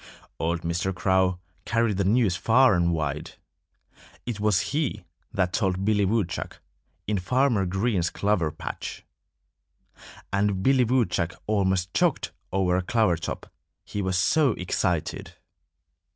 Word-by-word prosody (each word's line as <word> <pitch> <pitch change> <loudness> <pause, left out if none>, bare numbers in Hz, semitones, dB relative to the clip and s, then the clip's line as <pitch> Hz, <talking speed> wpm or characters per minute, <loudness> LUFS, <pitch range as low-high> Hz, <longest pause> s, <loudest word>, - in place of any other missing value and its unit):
Old 85 +1 -1
Mr. 85 +3 -1
Crow 95 0 +2 0.3
carried 115 -4 +1
the 100 - +1
news 105 -1 +3
far 125 +5 +4
and 85 -1 +2
wide. 75 -2 -3 0.9
It 120 -4 -4
was 105 -3 +2
he 150 - -1 0.3
that 90 -5 0
told 95 -2 0
Billy 105 -1 +3
Woodchuck, 100 -4 -2 0.5
in 105 -2 0
Farmer 120 0 +1
Green's 95 -2 0
clover 100 -6 0
patch. - - -7 1.3
And 100 -1 +1
Billy 130 0 +4
Woodchuck 110 -8 0
almost 95 -3 0
choked - - +1 0.2
over 95 -2 +1
a - - +1
clover 110 -1 +2
top, 85 - -6 0.3
he 105 - -4
was 95 -1 0
so 135 - +3
excited. 90 - -2
95 Hz, 125 wpm, -26 LUFS, 90-110 Hz, 1.3 s, far